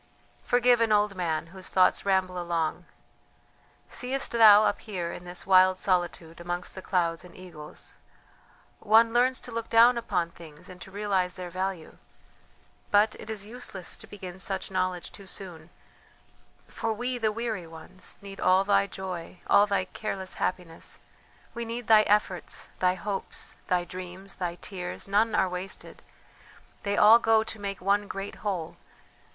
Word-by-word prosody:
"Forgive 245 Hz, -1 st, +4 dB
an 225 Hz, -1 st, +2 dB
old 210 Hz, -1 st, +3 dB
man 165 Hz, -4 st, -2 dB
whose 190 Hz, -1 st, -7 dB
thoughts 185 Hz, +1 st, +3 dB
ramble 185 Hz, -2 st, +1 dB
along; 170 Hz, 0 st, -2 dB, 1.0 s
seest 265 Hz, +2 st, -2 dB
thou, 215 Hz, -3 st, +8 dB
up -, -, +1 dB
here 180 Hz, -6 st, -4 dB
in 175 Hz, -, -9 dB
this 175 Hz, 0 st, -5 dB
wild 185 Hz, -1 st, +6 dB
solitude 175 Hz, -3 st, -1 dB
amongst 175 Hz, +1 st, -4 dB
the 190 Hz, -, -8 dB
clouds 170 Hz, -3 st, 0 dB
and 180 Hz, -, -14 dB
eagles, 170 Hz, -5 st, -10 dB, 0.9 s
one 225 Hz, +2 st, +5 dB
learns 255 Hz, +2 st, +3 dB
to 245 Hz, -, -8 dB
look 230 Hz, 0 st, -4 dB
down 235 Hz, +1 st, +6 dB
upon 180 Hz, -7 st, -1 dB
things 160 Hz, -3 st, -14 dB
and 180 Hz, -1 st, -12 dB
to -, -, -9 dB
realize 190 Hz, -2 st, -1 dB
their 180 Hz, -2 st, -7 dB
value; 185 Hz, -2 st, -4 dB, 0.9 s
but 210 Hz, +1 st, +4 dB
it -, -, -10 dB
is 210 Hz, -2 st, -5 dB
useless 210 Hz, -5 st, -7 dB
to -, -, -12 dB
begin 190 Hz, -2 st, -9 dB
such 190 Hz, 0 st, -2 dB
knowledge 185 Hz, -1 st, -2 dB
too 200 Hz, -2 st, -13 dB
soon, 175 Hz, -5 st, -7 dB, 1.0 s
for 225 Hz, -1 st, -2 dB
we, 245 Hz, +3 st, -2 dB
the 220 Hz, -2 st, +1 dB
weary 220 Hz, -6 st, -3 dB
ones, 165 Hz, +3 st, -9 dB
need 195 Hz, -1 st, -9 dB
all 185 Hz, +1 st, +4 dB
thy 200 Hz, 0 st, +3 dB
joy, 185 Hz, -2 st, -6 dB
all 205 Hz, -, +5 dB
thy 200 Hz, -2 st, +1 dB
careless 190 Hz, -1 st, -3 dB
happiness, 175 Hz, -3 st, -3 dB, 0.6 s
we 235 Hz, 0 st, -4 dB
need 230 Hz, +1 st, -5 dB
thy 215 Hz, -1 st, +7 dB
efforts, 200 Hz, -4 st, 0 dB
thy 180 Hz, 0 st, +3 dB
hopes, 195 Hz, 0 st, -5 dB
thy 180 Hz, -1 st, +2 dB
dreams, 185 Hz, +2 st, -9 dB
thy 175 Hz, -2 st, -3 dB
tears; 180 Hz, 0 st, -6 dB
none 210 Hz, +3 st, +2 dB
are 190 Hz, -, +3 dB
wasted; 180 Hz, +1 st, -7 dB, 0.8 s
they 200 Hz, 0 st, -1 dB
all 220 Hz, +2 st, +8 dB
go 225 Hz, -1 st, +4 dB
to 220 Hz, -, -7 dB
make 200 Hz, -1 st, -4 dB
one 200 Hz, +2 st, +1 dB
great 195 Hz, +1 st, -6 dB
whole! 185 Hz, -6 st, -4 dB
190 Hz, 155 wpm, -27 LUFS, 180-215 Hz, 1.0 s, thou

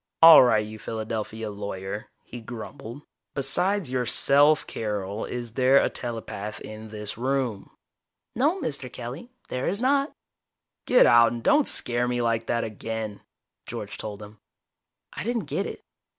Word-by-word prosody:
"All 165 Hz, 0 st, +11 dB
right, 110 Hz, -4 st, +3 dB
you 110 Hz, 0 st, -9 dB
Philadelphia 110 Hz, 0 st, -4 dB
lawyer," 100 Hz, 0 st, -6 dB, 0.2 s
he 120 Hz, -, -9 dB
grumbled. 120 Hz, +3 st, -9 dB, 0.3 s
"Besides 175 Hz, +4 st, 0 dB
yourself, 140 Hz, +4 st, +4 dB
Carol, 105 Hz, -1 st, -4 dB
is 120 Hz, -2 st, -5 dB
there 130 Hz, +2 st, +4 dB
a -, -, +3 dB
telepath 110 Hz, -3 st, -5 dB
in 110 Hz, +1 st, -9 dB
this 105 Hz, 0 st, -6 dB
room?" 130 Hz, -5 st, -1 dB, 0.7 s
"No, 300 Hz, -, +2 dB
Mr. 140 Hz, -, -4 dB
Kelly, 125 Hz, -, -7 dB, 0.2 s
there 125 Hz, 0 st, -2 dB
is 200 Hz, +3 st, -1 dB
not." 275 Hz, +3 st, +2 dB, 0.8 s
"Get 250 Hz, -, +6 dB
out, 115 Hz, 0 st, +6 dB
and 120 Hz, -1 st, -6 dB
don't 295 Hz, -1 st, +4 dB
scare 120 Hz, 0 st, +2 dB
me 120 Hz, 0 st, -1 dB
like 115 Hz, -1 st, 0 dB
that 120 Hz, 0 st, 0 dB
again." 110 Hz, -1 st, -5 dB, 0.5 s
George -, -, -6 dB
told 105 Hz, -1 st, -6 dB
him. 105 Hz, +1 st, -13 dB, 0.7 s
I -, -, -5 dB
didn't 230 Hz, -3 st, -2 dB
get -, -, -2 dB
it. -, -, -9 dB
120 Hz, 145 wpm, -25 LUFS, 110-140 Hz, 0.8 s, All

